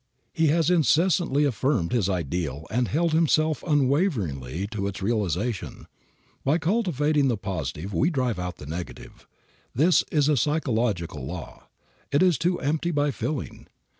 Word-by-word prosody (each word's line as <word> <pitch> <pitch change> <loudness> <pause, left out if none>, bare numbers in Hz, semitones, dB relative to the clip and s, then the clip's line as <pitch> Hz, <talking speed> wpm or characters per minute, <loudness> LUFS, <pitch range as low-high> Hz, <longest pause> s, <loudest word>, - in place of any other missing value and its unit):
He 160 -1 +2
has 165 +3 +2
incessantly 165 -2 +3
affirmed 125 - 0
his 110 -6 +1
ideal 80 -4 -2
and 120 +1 +1
held 165 +2 0
himself 155 -1 +2
unwaveringly 125 - 0
to 100 -3 -2
its 100 -1 -5
realization. 105 0 -2 0.6
By 145 +4 +2
cultivating 160 - +1
the 120 -4 +1
positive 90 -2 -4
we 140 - +2
drive 125 - -1
out 90 -1 -4
the - - -10
negative. 85 +4 -8 0.5
This 165 +8 +4
is 145 -3 +2
a 150 - +3
psychological 115 - -1
law. 90 +1 -8 0.4
It 145 +4 +3
is 175 -8 +3
to 175 +1 +1
"empty 155 +4 0
by 145 -3 +1
filling." 145 +1 -5
130 Hz, 140 wpm, -25 LUFS, 95-155 Hz, 0.6 s, This